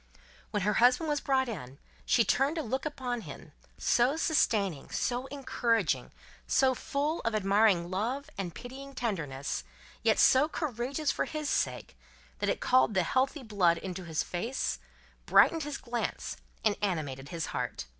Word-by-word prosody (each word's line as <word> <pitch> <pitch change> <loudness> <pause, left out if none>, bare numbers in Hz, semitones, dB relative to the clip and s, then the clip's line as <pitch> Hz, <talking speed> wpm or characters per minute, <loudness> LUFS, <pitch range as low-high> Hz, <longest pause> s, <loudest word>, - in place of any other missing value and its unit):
When 205 -2 -1
her 210 +1 +2
husband 250 +6 +4
was 295 -1 0
brought 265 -1 +2
in, 140 - -7 0.3
she - - +5
turned 280 +5 +1
a 320 - -1
look 265 +7 -2
upon 250 -5 -3
him, - - -10 0.3
so 250 +5 +2
sustaining, 205 - +1
so 250 +2 -1
encouraging, 230 - 0 0.4
so 265 -1 +4
full 290 +5 -2
of 230 -1 -1
admiring 195 -3 +3
love 245 +9 -2
and 180 -5 -4
pitying 270 +2 -9
tenderness, 150 - -3 0.4
yet 225 -1 +3
so 275 +4 +5
courageous 280 0 -2
for - - -1
his 305 -2 -3
sake, - - -1 0.4
that - - 0
it - - 0
called 255 -4 +3
the 185 - +3
healthy 265 - 0
blood 190 -7 +2
into 185 +1 -6
his 160 -2 -1
face, 230 +9 -2 0.5
brightened 325 - +5
his 295 -2 -4
glance, 240 -1 -3 0.3
and 210 -1 +3
animated 145 -8 -2
his 165 -2 -3
heart. - - -3
235 Hz, 155 wpm, -30 LUFS, 185-270 Hz, 0.5 s, she